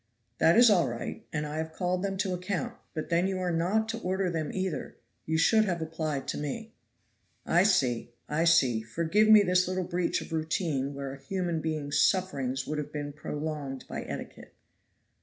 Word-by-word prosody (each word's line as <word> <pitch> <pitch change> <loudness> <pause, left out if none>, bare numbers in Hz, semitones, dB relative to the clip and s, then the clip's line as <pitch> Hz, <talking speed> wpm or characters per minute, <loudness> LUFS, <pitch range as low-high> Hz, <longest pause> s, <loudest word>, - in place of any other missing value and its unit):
"That 165 - +5
is 240 -2 +8
all 180 -4 +4
right, 120 -1 -5
and 150 -1 -2
I 150 +1 -5
have 160 0 -3
called 180 +1 -1
them 195 0 -2
to 190 -1 0
account, 195 +6 -3 0.2
but 155 - -4
then 175 +2 +2
you 190 -1 -2
are 180 -1 -1
not 185 +7 +1
to 230 0 -3
order 185 -2 -1
them 160 -2 -2
either; 185 -7 -3 0.3
you 160 0 +1
should 215 +7 +4
have 175 -4 -1
applied 160 -3 -3
to - - -2
me." 220 +10 -5 0.7
"I 175 - +4
see, 135 - +2 0.2
I 160 +3 +1
see! 135 -9 +4
Forgive 170 - +1
me 215 -1 +9
this 180 -1 +3
little 185 0 -1
breach 175 0 0
of - - -8
routine 155 -4 -1
where 140 -1 -5
a 135 - -11
human 175 +1 -2
being's 150 -2 -1
sufferings 135 -9 +1
would 150 0 -3
have 150 0 -5
been 145 -1 -4
prolonged 150 -3 -5
by - - -4
etiquette." - - -8
165 Hz, 190 wpm, -29 LUFS, 150-185 Hz, 0.7 s, me